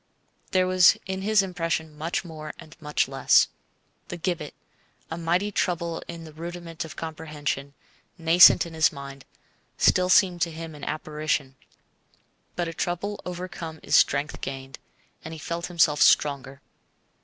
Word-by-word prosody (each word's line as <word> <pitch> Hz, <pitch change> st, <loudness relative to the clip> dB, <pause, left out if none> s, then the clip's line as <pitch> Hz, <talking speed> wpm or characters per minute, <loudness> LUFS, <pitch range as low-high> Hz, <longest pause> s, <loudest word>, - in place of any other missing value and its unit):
There 185 Hz, -1 st, +2 dB
was 185 Hz, -1 st, +5 dB
in 190 Hz, 0 st, -4 dB
his 210 Hz, 0 st, +3 dB
impression 165 Hz, -4 st, -3 dB
much 165 Hz, +5 st, -3 dB
more 155 Hz, -2 st, -8 dB
and 160 Hz, -2 st, -13 dB
much 150 Hz, -1 st, 0 dB
less. -, -, +4 dB, 0.6 s
The 175 Hz, -, -6 dB
gibbet, 170 Hz, -4 st, -3 dB, 0.6 s
a 165 Hz, -, -3 dB
mighty 175 Hz, +5 st, 0 dB
trouble 170 Hz, -3 st, -1 dB
in 170 Hz, -1 st, -8 dB
the 155 Hz, -1 st, -11 dB
rudiment 170 Hz, 0 st, -6 dB
of 155 Hz, -1 st, -10 dB
comprehension, 150 Hz, -3 st, -5 dB, 0.4 s
nascent 170 Hz, +2 st, +7 dB
in 170 Hz, -, -9 dB
his 160 Hz, -1 st, +3 dB
mind, 140 Hz, -1 st, -10 dB, 0.5 s
still 180 Hz, 0 st, +3 dB
seemed 180 Hz, -2 st, +4 dB
to 170 Hz, -, +2 dB
him 160 Hz, 0 st, -8 dB
an 145 Hz, -1 st, -12 dB
apparition; 150 Hz, -3 st, -2 dB, 1.0 s
but 175 Hz, -1 st, -1 dB
a 165 Hz, -, -5 dB
trouble 180 Hz, +5 st, -3 dB
overcome 175 Hz, -3 st, -6 dB
is -, -, +1 dB
strength 145 Hz, +2 st, +2 dB
gained, 135 Hz, -1 st, -6 dB, 0.4 s
and 160 Hz, +1 st, -7 dB
he -, -, -10 dB
felt 170 Hz, +2 st, -4 dB
himself 165 Hz, -4 st, +2 dB
stronger. 140 Hz, -1 st, +3 dB
165 Hz, 145 wpm, -25 LUFS, 150-175 Hz, 1.0 s, nascent